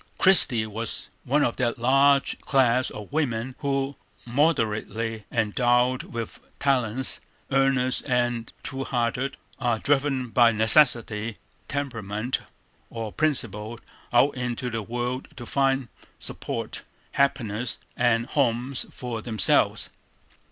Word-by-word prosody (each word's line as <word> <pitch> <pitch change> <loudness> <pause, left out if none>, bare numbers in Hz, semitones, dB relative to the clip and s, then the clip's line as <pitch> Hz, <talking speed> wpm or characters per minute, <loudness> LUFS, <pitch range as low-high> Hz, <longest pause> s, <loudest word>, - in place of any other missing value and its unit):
Christie 130 -12 +5
was 110 +2 -4 0.2
one 145 +3 +2
of 120 - 0
that 120 -2 0
large 135 +3 +3
class 130 -2 +2
of 105 -1 -9
women 130 -5 -1
who, 140 -1 -1 0.3
moderately 115 -5 0
endowed 120 +3 +2
with 115 -2 -7 0.2
talents, 130 -2 +1 0.3
earnest 135 -1 +2
and 120 -2 0
true 135 -1 -4
hearted, 125 +2 -1 0.2
are 120 -3 +1
driven 135 -1 0
by 120 0 +5
necessity, 110 -2 +4 0.3
temperament, 120 -5 -3 0.5
or 115 -2 -5
principle 120 -7 -1 0.3
out 125 +4 +4
into 125 -1 -3
the 115 0 -2
world 120 +3 -3
to 120 - -8
find 135 -1 +1 0.3
support, - - -4 0.3
happiness, 125 -4 0 0.2
and 120 -1 +2
homes 130 -1 0
for 120 -3 -6
themselves. 110 -2 +3
125 Hz, 110 wpm, -25 LUFS, 115-135 Hz, 0.5 s, Christie